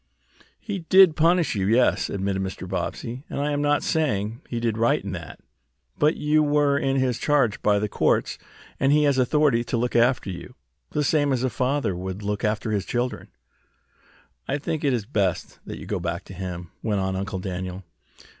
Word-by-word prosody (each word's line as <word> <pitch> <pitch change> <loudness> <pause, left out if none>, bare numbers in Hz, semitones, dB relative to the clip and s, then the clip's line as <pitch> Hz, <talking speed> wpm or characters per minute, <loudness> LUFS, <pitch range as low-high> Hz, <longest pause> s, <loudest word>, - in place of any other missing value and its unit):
"He 200 -3 -4
did 180 -1 +6
punish 170 +1 +3
you, 95 -3 -1
yes," 120 +4 +3
admitted 95 0 -2
Mr. 95 0 -5
Bobbsey, 125 +4 -4
"and - - -4
I 145 +1 0
am 145 0 0
not 145 0 +2
saying 110 -8 -1
he 120 - -2
did 115 -2 0
right 115 +1 +2
in 100 - -4
that. 85 -4 -7 0.6
But 150 +2 +2
you 150 +1 +2
were 145 -1 +2
put - - -4
in 135 - +1
his 130 -3 +1
charge 140 -8 +1
by 105 -1 +3
the 105 +1 0
courts, - - 0 0.4
and 135 - +3
he 150 +1 +4
has 140 -2 +3
authority 130 -2 +3
to 120 - -1
look 120 +1 -1
after 120 -4 +2
you, 90 - -9 0.3
the 150 - -1
same 145 0 +2
as 130 -2 0
a 130 - 0
father 130 -4 0
would 95 +3 -5
look 105 0 -2
after 110 +1 -1
his 100 -3 0
children." 125 +1 -2 1.2
"I 140 - 0
think 150 +2 -3
it 140 - +3
is 120 -5 -1
best 100 -6 -1
that - - -6
you - - -9
go 100 - -2
back 85 -1 -3
to - - -11
him," 90 -2 -6
went 105 -3 0
on 95 0 -1
Uncle 100 +1 -3
Daniel. 95 0 -5
120 Hz, 200 wpm, -24 LUFS, 100-145 Hz, 1.2 s, did